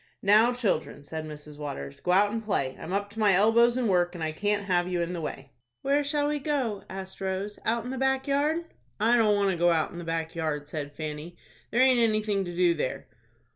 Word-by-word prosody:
"Now, 215 Hz, +4 st, +6 dB
children," 195 Hz, -, -1 dB
said 155 Hz, +2 st, -6 dB
Mrs. 150 Hz, -1 st, -10 dB
Waters, 140 Hz, -1 st, -6 dB
"go -, -, -6 dB
out 200 Hz, +3 st, +4 dB
and 225 Hz, +1 st, -3 dB
play. 140 Hz, -11 st, -1 dB
I'm 175 Hz, -, -7 dB
up 200 Hz, +1 st, -1 dB
to 220 Hz, -, -9 dB
my 210 Hz, -2 st, +4 dB
elbows 235 Hz, +5 st, +4 dB
in 250 Hz, -2 st, +1 dB
work, 175 Hz, -2 st, +2 dB
and 170 Hz, -, -5 dB
I 155 Hz, -, -1 dB
can't 205 Hz, +5 st, 0 dB
have 175 Hz, -2 st, +1 dB
you 180 Hz, -1 st, -1 dB
in 170 Hz, +1 st, -2 dB
the 170 Hz, -, -4 dB
way." 140 Hz, -2 st, -6 dB, 0.3 s
"Where 285 Hz, +1 st, +2 dB
shall 290 Hz, 0 st, 0 dB
we 295 Hz, 0 st, -1 dB
go?" 265 Hz, -9 st, -1 dB
asked 190 Hz, 0 st, -8 dB
Rose. 195 Hz, +2 st, -3 dB
"Out 230 Hz, 0 st, +1 dB
in 250 Hz, -, -5 dB
the 265 Hz, -, -4 dB
back 265 Hz, +1 st, +1 dB
yard." 300 Hz, +4 st, +1 dB, 0.3 s
"I 225 Hz, +3 st, +4 dB
don't 215 Hz, -3 st, +4 dB
want 200 Hz, -1 st, +2 dB
to 180 Hz, -, -2 dB
go 175 Hz, +1 st, +4 dB
out 165 Hz, -2 st, +1 dB
in 170 Hz, -, -8 dB
the -, -, -6 dB
back 165 Hz, -1 st, -3 dB
yard," 155 Hz, -3 st, -3 dB
said 145 Hz, -1 st, -6 dB
Fanny; 155 Hz, +2 st, -6 dB, 0.3 s
"there 240 Hz, -, +2 dB
aint 260 Hz, -1 st, +5 dB
anything 215 Hz, -3 st, +1 dB
to 175 Hz, -1 st, -6 dB
do 175 Hz, -1 st, +4 dB
there." 150 Hz, -5 st, -3 dB
195 Hz, 235 wpm, -27 LUFS, 165-230 Hz, 0.3 s, Now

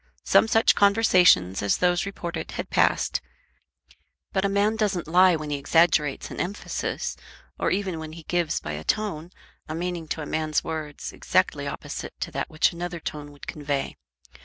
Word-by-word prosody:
Some -, -, +5 dB
such 225 Hz, 0 st, +4 dB
conversations 185 Hz, -, +4 dB
as 100 Hz, -, +2 dB
those 180 Hz, +1 st, +2 dB
reported 175 Hz, -3 st, -5 dB
had -, -, -5 dB
passed; -, -, +2 dB, 1.1 s
but 190 Hz, -, +1 dB
a 200 Hz, -, +2 dB
man 205 Hz, +2 st, +2 dB
doesn't 200 Hz, -7 st, -1 dB
lie 180 Hz, +2 st, +5 dB
when 155 Hz, -1 st, -5 dB
he 145 Hz, -, 0 dB
exaggerates 150 Hz, 0 st, +2 dB
an -, -, -7 dB
emphasis, 195 Hz, +4 st, -3 dB, 0.4 s
or -, -, +1 dB
even 185 Hz, -3 st, -1 dB
when 155 Hz, 0 st, -7 dB
he 165 Hz, 0 st, -10 dB
gives 175 Hz, -1 st, 0 dB
by 75 Hz, -, -6 dB
a 75 Hz, +1 st, -5 dB
tone 175 Hz, -, -1 dB, 0.4 s
a 155 Hz, -, -3 dB
meaning 175 Hz, -1 st, -3 dB
to 155 Hz, -, -3 dB
a -, -, -5 dB
man's 155 Hz, 0 st, -1 dB
words 155 Hz, -2 st, -5 dB
exactly -, -, +1 dB
opposite -, -, -6 dB
to -, -, -3 dB
that -, -, -3 dB
which 155 Hz, +2 st, +2 dB
another 175 Hz, 0 st, -5 dB
tone 150 Hz, -2 st, -6 dB
would 145 Hz, -, -13 dB
convey. 145 Hz, -2 st, -3 dB
170 Hz, 170 wpm, -25 LUFS, 150-185 Hz, 1.1 s, Some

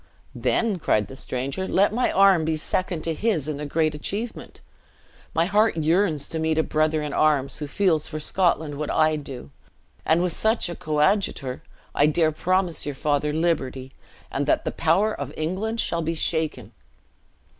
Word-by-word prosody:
"Then," 215 Hz, -5 st, 0 dB
cried 105 Hz, -9 st, +1 dB
the 135 Hz, -, -9 dB
stranger, 135 Hz, +9 st, -4 dB
"let 200 Hz, +2 st, +3 dB
my 245 Hz, +2 st, +1 dB
arm 195 Hz, -4 st, +5 dB
be 160 Hz, 0 st, 0 dB
second 175 Hz, +1 st, -2 dB
to 165 Hz, -, -1 dB
his 165 Hz, -6 st, -1 dB
in 150 Hz, -2 st, -3 dB
the 150 Hz, 0 st, -5 dB
great 155 Hz, +1 st, +1 dB
achievement. 205 Hz, +10 st, -5 dB, 0.8 s
My 165 Hz, +1 st, +3 dB
heart 210 Hz, 0 st, +2 dB
yearns 160 Hz, -2 st, +1 dB
to 160 Hz, -, -3 dB
meet 160 Hz, 0 st, 0 dB
a 160 Hz, -, +3 dB
brother 155 Hz, 0 st, 0 dB
in 150 Hz, -, -4 dB
arms 145 Hz, -3 st, +1 dB
who 150 Hz, -, -4 dB
feels 160 Hz, -1 st, +1 dB
for 155 Hz, -, -5 dB
Scotland 155 Hz, -3 st, 0 dB
what 150 Hz, -, -3 dB
I 155 Hz, 0 st, +3 dB
do; 135 Hz, -, -7 dB, 0.5 s
and 165 Hz, +2 st, +2 dB
with 180 Hz, -2 st, -1 dB
such 220 Hz, -3 st, 0 dB
a 170 Hz, -, -5 dB
coadjutor, 150 Hz, -4 st, 0 dB, 0.3 s
I 145 Hz, -, +4 dB
dare 155 Hz, +1 st, +2 dB
promise 180 Hz, +1 st, 0 dB
your 145 Hz, -1 st, -4 dB
father 150 Hz, +1 st, 0 dB
liberty, 135 Hz, -5 st, -1 dB, 0.4 s
and -, -, -2 dB
that -, -, +2 dB
the -, -, -1 dB
power 190 Hz, +7 st, +2 dB
of -, -, -5 dB
England 190 Hz, +9 st, -2 dB
shall 170 Hz, -5 st, 0 dB
be 165 Hz, +1 st, -2 dB
shaken." 160 Hz, -1 st, -1 dB
160 Hz, 175 wpm, -24 LUFS, 150-185 Hz, 0.8 s, arm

